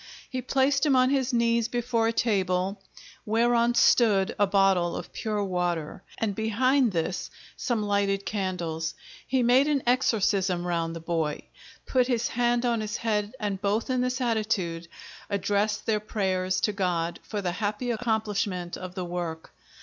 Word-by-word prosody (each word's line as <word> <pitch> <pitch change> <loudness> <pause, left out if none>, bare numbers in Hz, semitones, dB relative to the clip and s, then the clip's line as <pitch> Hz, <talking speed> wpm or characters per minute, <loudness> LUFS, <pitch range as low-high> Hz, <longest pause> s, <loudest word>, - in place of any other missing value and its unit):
He 255 -1 -2
placed 270 +3 +2
him 290 -4 +4
on 255 +1 +4
his 270 -2 +1
knees 235 -1 +2
before 235 -1 0
a - - +2
table, 195 -3 0 0.4
whereon 235 +2 +2
stood 210 -6 +4
a 205 - +4
Bottle 195 -3 +3
of - - -7
pure 210 -2 -2
water, 175 -4 -2 0.2
and 215 -3 -1
behind 235 +4 +2
this 175 +1 -2 0.3
some 235 -5 -1
lighted 200 -1 0
candles: 170 -5 -3 0.3
he 260 -1 +1
made 255 +4 +5
an 290 -3 +1
exorcism 200 -7 +2
round 165 -1 -1
the - - -5
boy, 160 -3 -2 0.4
put 255 -2 +2
his 240 -3 0
hand 240 0 +1
on 235 -2 +1
his 215 0 -3
head 215 0 -1
and 200 -3 -3
both, 210 +5 0
in 255 -1 +1
this 250 +1 -1
attitude, 210 -8 -1 0.4
addressed 210 +1 0
their 215 -1 +1
prayers 185 -3 -1
to 210 - +2
God 175 -4 -1
for 210 - -5
the 180 -3 -1
happy 210 +6 -2
accomplishment 210 -6 -1
of 185 -1 -8
the 185 -2 -3
work. 170 -2 -5
210 Hz, 155 wpm, -27 LUFS, 185-235 Hz, 0.4 s, made